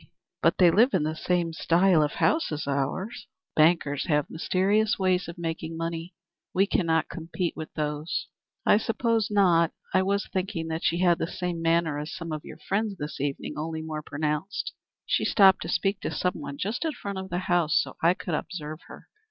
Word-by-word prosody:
"But -, -, +3 dB
they 175 Hz, -2 st, +6 dB
live 235 Hz, +7 st, +4 dB
in 170 Hz, -, +2 dB
the 155 Hz, +1 st, -1 dB
same 170 Hz, 0 st, 0 dB
style 170 Hz, +1 st, +4 dB
of 150 Hz, -1 st, 0 dB
house 315 Hz, -, +1 dB
as 150 Hz, 0 st, -3 dB
ours." 140 Hz, -, -2 dB, 0.3 s
"Bankers 155 Hz, -3 st, +3 dB
have 150 Hz, -3 st, +1 dB
mysterious 200 Hz, +6 st, +1 dB
ways 185 Hz, -2 st, +1 dB
of 170 Hz, +1 st, -8 dB
making 165 Hz, -1 st, -4 dB
money. 165 Hz, +1 st, -4 dB, 0.4 s
We 195 Hz, +2 st, +5 dB
cannot 165 Hz, -5 st, +1 dB
compete 170 Hz, +1 st, -4 dB
with 155 Hz, -, -7 dB
those." 150 Hz, +1 st, -2 dB, 0.4 s
"I -, -, +6 dB
suppose 225 Hz, -1 st, 0 dB
not. 175 Hz, -5 st, +4 dB, 0.2 s
I 185 Hz, -, +5 dB
was 200 Hz, +1 st, 0 dB
thinking 185 Hz, -3 st, -2 dB
that 160 Hz, +1 st, -3 dB
she 170 Hz, +2 st, +1 dB
had 175 Hz, -2 st, +4 dB
the 165 Hz, -, -1 dB
same 180 Hz, -2 st, -3 dB
manner 165 Hz, -2 st, +2 dB
as 150 Hz, +3 st, -5 dB
some 165 Hz, -2 st, -6 dB
of 155 Hz, -1 st, -4 dB
your -, -, -10 dB
friends 200 Hz, +5 st, -2 dB
this 150 Hz, -2 st, -5 dB
evening, 145 Hz, +1 st, -3 dB
only 160 Hz, 0 st, -3 dB
more 155 Hz, -1 st, -4 dB
pronounced. 150 Hz, +6 st, -3 dB, 0.3 s
She -, -, +1 dB
stopped 195 Hz, -3 st, +5 dB
to -, -, -5 dB
speak 195 Hz, 0 st, 0 dB
to -, -, -3 dB
some 180 Hz, -1 st, 0 dB
one 140 Hz, -1 st, -6 dB
just 215 Hz, -, -2 dB
in 320 Hz, -2 st, -1 dB
front 200 Hz, -6 st, -5 dB
of 190 Hz, 0 st, -7 dB
the 175 Hz, -, -2 dB
house, 175 Hz, -4 st, +2 dB
so -, -, -3 dB
I 170 Hz, +2 st, +4 dB
could 175 Hz, -, -5 dB
observe 155 Hz, -1 st, -4 dB
her. -, -, -12 dB
170 Hz, 195 wpm, -27 LUFS, 155-190 Hz, 0.4 s, they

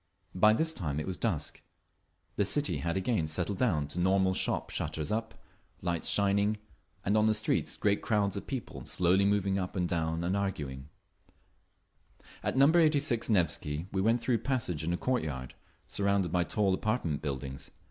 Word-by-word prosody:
By 105 Hz, +4 st, +5 dB
this 160 Hz, +7 st, +2 dB
time 75 Hz, -, -3 dB
it 75 Hz, -, -3 dB
was 95 Hz, -, -3 dB
dusk. -, -, -2 dB, 0.7 s
The 100 Hz, -, +2 dB
city 140 Hz, +9 st, +1 dB
had 85 Hz, +2 st, -2 dB
again 95 Hz, -4 st, 0 dB
settled 90 Hz, +5 st, -2 dB
down 80 Hz, -13 st, +2 dB
to 85 Hz, -, -4 dB
normal—shop 95 Hz, +1 st, +1 dB
shutters 80 Hz, -1 st, -2 dB
up, 110 Hz, +1 st, -2 dB, 0.5 s
lights 85 Hz, -2 st, -1 dB
shining, 100 Hz, +1 st, +2 dB, 0.5 s
and 100 Hz, -, +2 dB
on 110 Hz, 0 st, +4 dB
the 110 Hz, -, +3 dB
streets 110 Hz, +1 st, 0 dB
great 100 Hz, -1 st, +1 dB
crowds 105 Hz, -3 st, +1 dB
of 100 Hz, -, -6 dB
people 130 Hz, -8 st, -5 dB
slowly 90 Hz, +2 st, +3 dB
moving 100 Hz, -1 st, +1 dB
up 90 Hz, +1 st, -4 dB
and 90 Hz, -2 st, 0 dB
down 80 Hz, -1 st, -1 dB
and 90 Hz, +3 st, 0 dB
arguing…. 75 Hz, -9 st, -3 dB, 1.5 s
At -, -, -2 dB
Number 150 Hz, +6 st, +6 dB
86 145 Hz, -7 st, +2 dB
Nevsky 80 Hz, -5 st, +1 dB
we 95 Hz, -, 0 dB
went 115 Hz, +4 st, +2 dB
through 120 Hz, -2 st, +1 dB
a -, -, -9 dB
passage 110 Hz, -, -1 dB
into 85 Hz, +2 st, 0 dB
a -, -, -4 dB
courtyard, 75 Hz, -, -2 dB, 0.3 s
surrounded 100 Hz, -3 st, +1 dB
by 90 Hz, 0 st, +1 dB
tall 100 Hz, +1 st, +1 dB
apartment 95 Hz, -, -1 dB
buildings. 70 Hz, -2 st, -5 dB
95 Hz, 170 wpm, -30 LUFS, 85-110 Hz, 1.5 s, Number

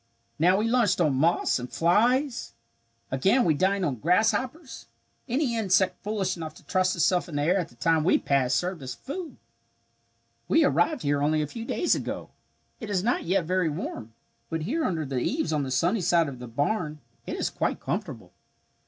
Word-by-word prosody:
"Now 180 Hz, +4 st, +4 dB
we 215 Hz, +2 st, +1 dB
lunched 230 Hz, -6 st, +2 dB
on 155 Hz, -5 st, +3 dB
moths 155 Hz, +1 st, +2 dB
and 125 Hz, 0 st, -7 dB
flies. 230 Hz, -, +1 dB, 0.6 s
Again 195 Hz, -, +3 dB
we 165 Hz, -, +4 dB
dined 190 Hz, +4 st, +1 dB
on 135 Hz, -6 st, -1 dB
grasshoppers. 245 Hz, -, 0 dB, 0.4 s
Any 255 Hz, -1 st, 0 dB
insect 190 Hz, -4 st, +1 dB
foolish 200 Hz, -3 st, -1 dB
enough 160 Hz, -2 st, -7 dB
to -, -, -17 dB
trust 185 Hz, -1 st, +1 dB
itself 180 Hz, +2 st, +1 dB
in 155 Hz, -, -7 dB
the 145 Hz, -, 0 dB
air 180 Hz, +5 st, +2 dB
at 175 Hz, -, -3 dB
the 120 Hz, -, -20 dB
time 160 Hz, +4 st, +2 dB
we 175 Hz, -, +4 dB
passed 130 Hz, -3 st, +1 dB
served 180 Hz, +2 st, -3 dB
as 130 Hz, -2 st, -6 dB
food. 295 Hz, -, -7 dB, 1.1 s
"We -, -, +4 dB
arrived 170 Hz, +5 st, +1 dB
here 145 Hz, 0 st, +1 dB
only 155 Hz, +1 st, +2 dB
a -, -, -1 dB
few 225 Hz, +10 st, -7 dB
days 345 Hz, -, +1 dB
ago. -, -, -4 dB, 0.5 s
It 220 Hz, -5 st, -7 dB
is 190 Hz, -3 st, 0 dB
not 240 Hz, +3 st, 0 dB
yet 185 Hz, 0 st, +1 dB
very 180 Hz, -1 st, +1 dB
warm, 130 Hz, -, -6 dB, 0.4 s
but 160 Hz, -1 st, -3 dB
here 305 Hz, -, -1 dB
under 160 Hz, -4 st, -1 dB
the 135 Hz, -2 st, -2 dB
eaves 280 Hz, -, -1 dB
on 150 Hz, -, +1 dB
the 135 Hz, -, -3 dB
sunny 175 Hz, -, +1 dB
side 170 Hz, -2 st, +3 dB
of 130 Hz, -3 st, -7 dB
the 125 Hz, -, -8 dB
barn 150 Hz, -, -2 dB, 0.3 s
it -, -, -3 dB
is -, -, -2 dB
quite -, -, -1 dB
comfortable. -, -, -5 dB
175 Hz, 190 wpm, -26 LUFS, 150-210 Hz, 1.1 s, Now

